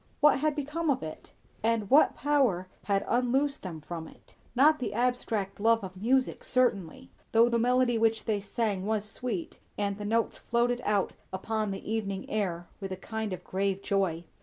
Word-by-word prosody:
What 295 Hz, -2 st, +5 dB
had 305 Hz, 0 st, +1 dB
become 300 Hz, +3 st, -2 dB
of 265 Hz, -, +1 dB
it? 155 Hz, 0 st, -8 dB, 0.3 s
and 225 Hz, -2 st, +1 dB
what 290 Hz, +3 st, +6 dB
power 260 Hz, -12 st, +2 dB, 0.2 s
had 200 Hz, -1 st, +1 dB
unloosed 265 Hz, +4 st, +1 dB
them 165 Hz, -5 st, -7 dB
from 160 Hz, +1 st, -6 dB
it? -, -, -18 dB, 0.2 s
Not 300 Hz, +5 st, +5 dB
the 250 Hz, -, -3 dB
abstract 225 Hz, -5 st, -1 dB
love 225 Hz, +1 st, +3 dB
of 185 Hz, -1 st, -7 dB
music, 250 Hz, +7 st, +1 dB
certainly; 250 Hz, -1 st, 0 dB, 0.2 s
though 230 Hz, +1 st, +6 dB
the 235 Hz, -1 st, +1 dB
melody 245 Hz, 0 st, +3 dB
which 225 Hz, 0 st, +2 dB
they 210 Hz, -2 st, 0 dB
sang 205 Hz, -2 st, -2 dB
was 215 Hz, -1 st, 0 dB
sweet, 215 Hz, -4 st, -4 dB, 0.2 s
and 200 Hz, 0 st, -1 dB
the -, -, -4 dB
notes 225 Hz, +2 st, 0 dB
floated 240 Hz, +1 st, 0 dB
out 205 Hz, -2 st, +1 dB, 0.2 s
upon 215 Hz, +3 st, -2 dB
the 195 Hz, -, -6 dB
evening 205 Hz, -3 st, -2 dB
air 175 Hz, -5 st, -1 dB
with 195 Hz, -2 st, -5 dB
a 185 Hz, -, -3 dB
kind 220 Hz, +2 st, -4 dB
of 185 Hz, -, -5 dB
grave 195 Hz, 0 st, -1 dB
joy. 185 Hz, -4 st, 0 dB
220 Hz, 180 wpm, -29 LUFS, 195-245 Hz, 0.3 s, what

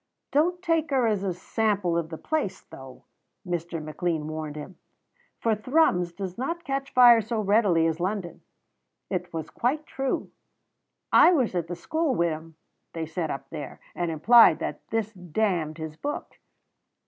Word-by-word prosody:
"Don't 350 Hz, +5 st, +1 dB
take 330 Hz, -3 st, +1 dB
her 265 Hz, -4 st, +2 dB
as 210 Hz, -4 st, +1 dB
a 195 Hz, -, 0 dB
sample 195 Hz, 0 st, 0 dB
of 170 Hz, -2 st, -1 dB
the 160 Hz, -, -6 dB
place, 310 Hz, -, -2 dB
though," 130 Hz, -1 st, -13 dB, 0.4 s
Mr. 170 Hz, -1 st, -3 dB
McLean 155 Hz, +1 st, -2 dB
warned 155 Hz, -1 st, -5 dB
him, 155 Hz, +4 st, -9 dB, 0.6 s
"for 230 Hz, -, +1 dB
Thrums 215 Hz, -, +2 dB
does 185 Hz, +2 st, -6 dB
not 335 Hz, +7 st, -3 dB
catch 275 Hz, -2 st, -3 dB
fire 240 Hz, -2 st, +7 dB
so 225 Hz, +1 st, -3 dB
readily 200 Hz, -5 st, +3 dB
as 165 Hz, 0 st, 0 dB
London." 185 Hz, -1 st, -3 dB, 0.7 s
It 180 Hz, -2 st, -3 dB
was 160 Hz, -2 st, -5 dB
quite 295 Hz, +6 st, -1 dB
true. 270 Hz, -1 st, -3 dB, 0.8 s
"I -, -, +8 dB
was 260 Hz, -, +1 dB
at 175 Hz, -2 st, -1 dB
the 175 Hz, -, -4 dB
school 315 Hz, -, -1 dB
wi' 170 Hz, 0 st, +2 dB
him," 160 Hz, +1 st, -8 dB, 0.4 s
they 165 Hz, -1 st, -3 dB
said 160 Hz, 0 st, -3 dB
up 135 Hz, -1 st, -6 dB
there, 150 Hz, -4 st, -7 dB
and 175 Hz, -1 st, -2 dB
implied 225 Hz, +10 st, +6 dB
that -, -, -4 dB
this 225 Hz, -1 st, -2 dB
damned 180 Hz, -3 st, -1 dB
his 160 Hz, -1 st, -6 dB
book. 290 Hz, -, -5 dB
185 Hz, 160 wpm, -26 LUFS, 165-240 Hz, 0.8 s, I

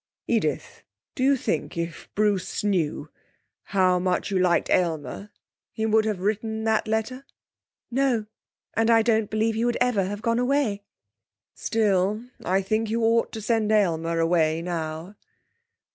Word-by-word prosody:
'Edith, -, -, -1 dB, 0.3 s
do -, -, -6 dB
you 275 Hz, +1 st, +4 dB
think 155 Hz, -, -3 dB
if 170 Hz, 0 st, -5 dB
Bruce 205 Hz, -3 st, 0 dB
knew 165 Hz, -7 st, -1 dB, 0.5 s
how 185 Hz, -2 st, +2 dB
much 180 Hz, +2 st, -1 dB
you 190 Hz, -, +1 dB
liked 180 Hz, -2 st, +2 dB
Aylmer 170 Hz, +3 st, -1 dB, 0.4 s
he 220 Hz, -, -2 dB
would 220 Hz, 0 st, +3 dB
have 210 Hz, -4 st, -2 dB
written 220 Hz, +2 st, -1 dB
that 220 Hz, -1 st, +1 dB
letter?' 220 Hz, +5 st, -2 dB, 0.7 s
'No. 250 Hz, -4 st, +1 dB, 0.5 s
And 225 Hz, 0 st, +1 dB
I 225 Hz, -1 st, +5 dB
don't 220 Hz, -2 st, +1 dB
believe 220 Hz, +1 st, +1 dB
he 225 Hz, +1 st, -1 dB
would 240 Hz, 0 st, +1 dB
ever 245 Hz, -6 st, +2 dB
have 205 Hz, +3 st, -5 dB
gone 230 Hz, 0 st, +1 dB
away.' 250 Hz, -5 st, +1 dB, 0.7 s
'Still, 210 Hz, 0 st, 0 dB, 0.2 s
I 190 Hz, +2 st, +1 dB
think 215 Hz, +3 st, -1 dB
you 230 Hz, +1 st, 0 dB
ought 230 Hz, +1 st, +2 dB
to 220 Hz, -, -5 dB
send 220 Hz, 0 st, +1 dB
Aylmer 170 Hz, -6 st, +1 dB
away 165 Hz, -1 st, +2 dB
now.' 165 Hz, +1 st, -4 dB
210 Hz, 145 wpm, -25 LUFS, 180-225 Hz, 0.7 s, I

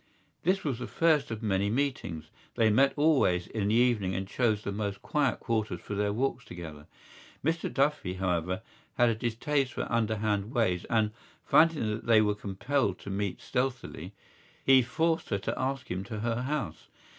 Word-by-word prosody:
This 190 Hz, +3 st, +1 dB
was 135 Hz, -6 st, -2 dB
the 125 Hz, -, -4 dB
first 155 Hz, -4 st, +2 dB
of 110 Hz, 0 st, -5 dB
many 100 Hz, -1 st, +1 dB
meetings; 115 Hz, -, -2 dB, 0.2 s
they 110 Hz, -1 st, +4 dB
met 135 Hz, +5 st, +5 dB
always 140 Hz, -, +3 dB
in 105 Hz, -3 st, -2 dB
the 105 Hz, -, +2 dB
evening 115 Hz, -6 st, +2 dB
and 95 Hz, 0 st, -3 dB
chose 110 Hz, -1 st, +1 dB
the -, -, -3 dB
most 100 Hz, -1 st, -4 dB
quiet 145 Hz, -3 st, +1 dB
quarters 110 Hz, -7 st, -1 dB
for 105 Hz, -, -7 dB
their 105 Hz, 0 st, 0 dB
walks 125 Hz, +2 st, -1 dB
together. 80 Hz, -4 st, -9 dB, 0.6 s
Mr 165 Hz, +1 st, 0 dB
Duffy, 140 Hz, -9 st, 0 dB
however, 90 Hz, -1 st, -1 dB, 0.3 s
had 120 Hz, -1 st, +4 dB
a -, -, +2 dB
distaste 125 Hz, +4 st, -1 dB
for -, -, -2 dB
underhand 110 Hz, -3 st, 0 dB
ways 90 Hz, -7 st, +1 dB
and, 110 Hz, -3 st, +1 dB, 0.3 s
finding 165 Hz, -6 st, +4 dB
that 105 Hz, +2 st, -5 dB
they 115 Hz, -2 st, +6 dB
were 105 Hz, -1 st, +3 dB
compelled 105 Hz, +2 st, -1 dB
to 100 Hz, -, -8 dB
meet 100 Hz, -1 st, -2 dB
stealthily, 125 Hz, -8 st, -3 dB, 0.5 s
he 135 Hz, -1 st, +7 dB
forced 160 Hz, +7 st, 0 dB
her 100 Hz, -, +1 dB
to 100 Hz, -, -3 dB
ask 135 Hz, +1 st, -3 dB
him 90 Hz, +2 st, -2 dB
to 105 Hz, +1 st, -5 dB
her 115 Hz, +1 st, -1 dB
house. 130 Hz, -, -3 dB
110 Hz, 175 wpm, -29 LUFS, 100-135 Hz, 0.6 s, he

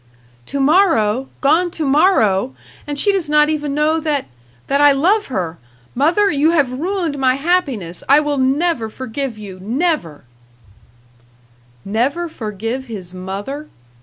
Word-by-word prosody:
"To 280 Hz, -, -3 dB
morrow! 270 Hz, -, +3 dB
Gone 330 Hz, +6 st, +3 dB
to 325 Hz, -3 st, -4 dB
morrow! 265 Hz, -, +3 dB, 0.3 s
And 290 Hz, -1 st, -4 dB
she 405 Hz, +8 st, +3 dB
does 375 Hz, -6 st, -2 dB
not 300 Hz, 0 st, +4 dB
even 295 Hz, -2 st, -2 dB
know 310 Hz, +2 st, +2 dB
that 300 Hz, -3 st, -1 dB, 0.4 s
that 280 Hz, +1 st, +1 dB
I 290 Hz, 0 st, +7 dB
love 380 Hz, +10 st, +2 dB
her. 175 Hz, -9 st, -4 dB, 0.3 s
Mother, 345 Hz, -, +2 dB
you 295 Hz, +2 st, +2 dB
have 290 Hz, -7 st, +2 dB
ruined 330 Hz, 0 st, -2 dB
my 260 Hz, -1 st, +3 dB
happiness. 275 Hz, -, -1 dB
I 285 Hz, +2 st, +7 dB
will 295 Hz, -2 st, -1 dB
never 265 Hz, -2 st, +1 dB
forgive 255 Hz, +1 st, -5 dB
you 195 Hz, -3 st, -9 dB
never!" 230 Hz, -, -2 dB, 1.6 s
Never 260 Hz, -, -1 dB
forgive 225 Hz, -, -5 dB
his 190 Hz, -6 st, -7 dB
mother! 200 Hz, +11 st, -6 dB
280 Hz, 135 wpm, -18 LUFS, 225-315 Hz, 1.6 s, I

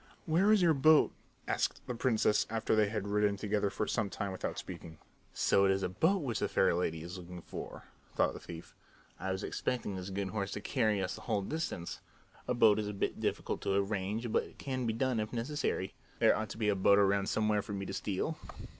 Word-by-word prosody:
"Where 180 Hz, +6 st, +4 dB
is 210 Hz, -4 st, +5 dB
your 165 Hz, -2 st, +5 dB
boat?" 155 Hz, +2 st, +5 dB, 0.4 s
asked -, -, -1 dB
the -, -, -3 dB
princess 115 Hz, -3 st, +2 dB
after 110 Hz, 0 st, +1 dB
they 105 Hz, -1 st, +3 dB
had 105 Hz, -2 st, -3 dB
ridden 105 Hz, 0 st, +2 dB
together 105 Hz, 0 st, 0 dB
for 105 Hz, -, -2 dB
some 105 Hz, -2 st, -1 dB
time 100 Hz, 0 st, -3 dB
without 95 Hz, -, -4 dB
speaking. 85 Hz, -3 st, -8 dB, 0.3 s
"So 100 Hz, -, +3 dB
it -, -, +4 dB
is 95 Hz, 0 st, +1 dB
a -, -, 0 dB
boat 165 Hz, -, +2 dB
which 120 Hz, -6 st, -2 dB
the -, -, +1 dB
fair -, -, +3 dB
lady 80 Hz, -2 st, -1 dB
is 90 Hz, +2 st, -7 dB
looking 90 Hz, -1 st, -9 dB
for," -, -, -8 dB, 0.3 s
thought -, -, +2 dB
the -, -, -8 dB
thief. 85 Hz, -1 st, -10 dB, 0.5 s
"I 95 Hz, +3 st, -2 dB
was 95 Hz, +2 st, -3 dB
expecting 120 Hz, -6 st, -2 dB
this 95 Hz, +1 st, -5 dB
good 95 Hz, 0 st, -2 dB
horse 100 Hz, -2 st, -3 dB
to -, -, -3 dB
carry 110 Hz, -5 st, +1 dB
us 90 Hz, -, -2 dB
the -, -, -9 dB
whole 105 Hz, -4 st, -1 dB
distance. 125 Hz, -, -4 dB, 0.5 s
A 125 Hz, -, +1 dB
boat 110 Hz, -3 st, +5 dB
is 105 Hz, -, -2 dB
a 105 Hz, -, -3 dB
bit 100 Hz, -, -2 dB
difficult -, -, -2 dB
to 95 Hz, -, 0 dB
arrange, 100 Hz, +3 st, -1 dB
but -, -, +3 dB
it -, -, -13 dB
can 130 Hz, -3 st, -3 dB
be 110 Hz, -, +1 dB
done 125 Hz, 0 st, 0 dB
if 110 Hz, +1 st, -2 dB
necessary. 120 Hz, -6 st, -2 dB, 0.2 s
There -, -, +5 dB
ought 110 Hz, 0 st, -3 dB
to -, -, -7 dB
be 110 Hz, -2 st, +1 dB
a 100 Hz, -, +2 dB
boat 100 Hz, +1 st, +5 dB
around 100 Hz, -1 st, +3 dB
somewhere 105 Hz, -1 st, +2 dB
for 105 Hz, +1 st, -7 dB
me 100 Hz, -1 st, -3 dB
to -, -, -5 dB
steal." 105 Hz, +11 st, -2 dB
105 Hz, 225 wpm, -32 LUFS, 95-115 Hz, 0.5 s, is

